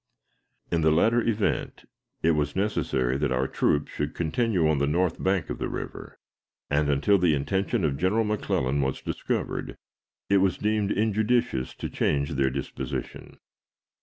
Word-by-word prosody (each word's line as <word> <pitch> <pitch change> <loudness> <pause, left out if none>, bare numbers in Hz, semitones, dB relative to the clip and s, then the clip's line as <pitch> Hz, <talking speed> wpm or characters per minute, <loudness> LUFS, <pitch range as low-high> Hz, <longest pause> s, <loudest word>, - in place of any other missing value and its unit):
In 85 -1 +1
the 80 - +4
latter 115 +10 +3
event, 110 -3 -1 0.4
it 85 - +4
was 75 -2 0
necessary 70 -10 0
that 75 -3 0
our 65 +1 +1
troops 75 +2 0
should 75 +1 -3
continue 90 +1 +1
on 75 -2 +2
the 70 - +1
north 85 +3 0
bank 95 -3 0
of - - -5
the - - -2
river, - - -7 0.5
and, 75 0 +2
until 85 +8 +3
the 85 -4 +3
intention 95 - -1
of 70 -2 -1
General 100 +6 +2
McClellan 70 -10 0
was 65 -1 -1
discovered, - - -3 0.5
it 100 - +4
was 95 -1 +2
deemed 105 -1 0
injudicious 110 - +1
to - - -4
change 70 -1 0
their 70 -2 +1
disposition. 65 0 -5
80 Hz, 155 wpm, -26 LUFS, 70-105 Hz, 0.5 s, the